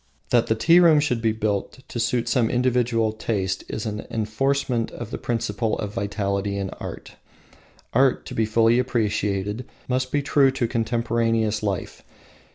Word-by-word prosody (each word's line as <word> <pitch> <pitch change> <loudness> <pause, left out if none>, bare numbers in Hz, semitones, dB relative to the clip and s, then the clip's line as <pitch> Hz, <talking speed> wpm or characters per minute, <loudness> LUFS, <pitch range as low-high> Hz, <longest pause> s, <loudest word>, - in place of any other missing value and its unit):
That 120 -2 +3
the 110 - +2
tea 165 +10 +5
room 165 -4 +6
should 125 -6 0
be 115 -1 +2
built 110 +2 -2
to 120 - -5
suit 120 +1 0
some 120 -4 +2
individual 120 -3 +1
taste 100 -4 -2
is 110 - -4
an 105 -1 -4
enforcement 115 +2 0
of 120 -1 -8
the - - -4
principle 115 -1 -1
of 105 -1 -4
vitality 100 0 -2
in 95 -1 -3
art. - - -8 0.8
Art, 130 +1 +3
to - - -7
be 110 -1 +1
fully 115 +2 +4
appreciated, 105 -2 -1 0.2
must 130 0 -1
be 145 -1 +1
true 140 -1 +4
to 130 -3 -1
contemporaneous 115 -1 0
life. 100 -3 -3
115 Hz, 160 wpm, -24 LUFS, 105-125 Hz, 0.8 s, room